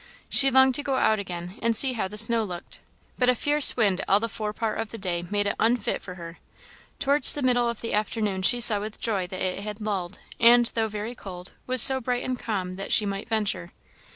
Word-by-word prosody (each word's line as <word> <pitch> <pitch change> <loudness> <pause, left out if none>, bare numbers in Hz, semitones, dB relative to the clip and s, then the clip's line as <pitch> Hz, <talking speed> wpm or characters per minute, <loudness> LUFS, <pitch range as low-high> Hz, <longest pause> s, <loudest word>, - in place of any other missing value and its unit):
She 275 - +4
longed 265 0 +4
to 290 - -3
go 275 -2 -3
out 220 -4 +1
again 180 0 -8
and 230 0 0
see 260 +3 +4
how 220 -5 -3
the 210 +2 -11
snow 225 +1 +1
looked, 180 -3 -10 0.4
but 250 -1 +2
a 250 - +2
fierce 290 +3 +3
wind 200 -5 0
all 200 - +3
the 230 - -3
fore 215 -2 -5
part 220 +1 -4
of 225 -1 -4
the 230 - -9
day 180 -4 -4
made 205 0 -1
it 200 - -2
unfit 230 -1 -1
for 180 - -10
her. 170 -1 -11 0.6
Towards 280 +2 +6
the 290 - -4
middle 245 -2 +1
of 235 - -7
the 230 - -5
afternoon 210 -2 -2
she 240 +6 +3
saw 220 -3 +6
with 210 +1 -8
joy 200 -5 -2
that 185 +1 -8
it 185 0 -3
had 210 +1 -7
lulled, 195 -5 -4 0.2
and, 240 +1 +5
though 225 -1 -1
very 215 +2 -6
cold, 185 -5 -10 0.2
was 255 -2 +7
so 265 -1 +7
bright 245 0 -3
and 255 -1 -4
calm, 185 -4 -5
that 195 - -7
she 215 - +3
might 200 +3 -6
venture. 210 - -3
215 Hz, 235 wpm, -24 LUFS, 195-245 Hz, 0.6 s, was